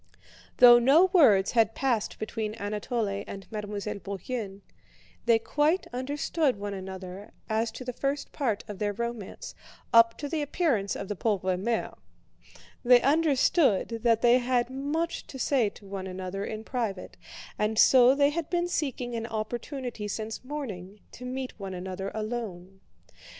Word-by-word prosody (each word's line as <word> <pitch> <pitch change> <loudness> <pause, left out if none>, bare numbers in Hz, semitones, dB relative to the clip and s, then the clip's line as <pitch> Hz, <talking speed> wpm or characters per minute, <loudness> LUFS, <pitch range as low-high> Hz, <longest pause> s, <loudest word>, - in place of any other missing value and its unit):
Though 240 -1 +9
no 310 +10 +5
words 210 - +5
had 225 -2 +2
passed 245 -6 -1
between 215 0 -4
Anatole 210 -1 -2
and 195 -1 -8
Mademoiselle 210 -1 -4
Bourienne, 200 +1 -5 0.7
they 230 -1 +6
quite 300 +10 +1
understood 285 +2 0
one 205 0 -5
another 190 0 -8 0.2
as 220 +1 0
to 255 - -8
the 250 - -4
first 275 +3 -2
part 230 -8 -1
of 205 -3 -8
their 205 -1 -1
romance, 235 -2 -5 0.4
up 230 0 +6
to 290 - -4
the 310 +1 -2
appearance 280 - 0
of 195 - -5
the 210 - -3
pauvre 190 -2 0
mère; 225 +5 -2 0.8
they 245 0 +7
understood 280 - +2
that 230 -1 +2
they 240 +1 +6
had 245 0 0
much 295 +5 -3
to 270 - -9
say 255 -4 +2
to 200 - -17
one 195 -1 -6
another 185 +1 -5
in 215 +1 -5
private 225 -6 -4 0.4
and 215 +1 0
so 255 +2 +7
they 285 0 +3
had 330 0 -3
been 350 0 0
seeking 260 -7 -2
an 230 -1 -3
opportunity 235 +1 -4
since 220 +2 -5
morning 215 -9 -6
to 250 - -10
meet 255 0 -4
one 195 -2 -5
another 190 +1 -5
alone. 210 -5 -5
230 Hz, 150 wpm, -28 LUFS, 200-265 Hz, 0.8 s, Though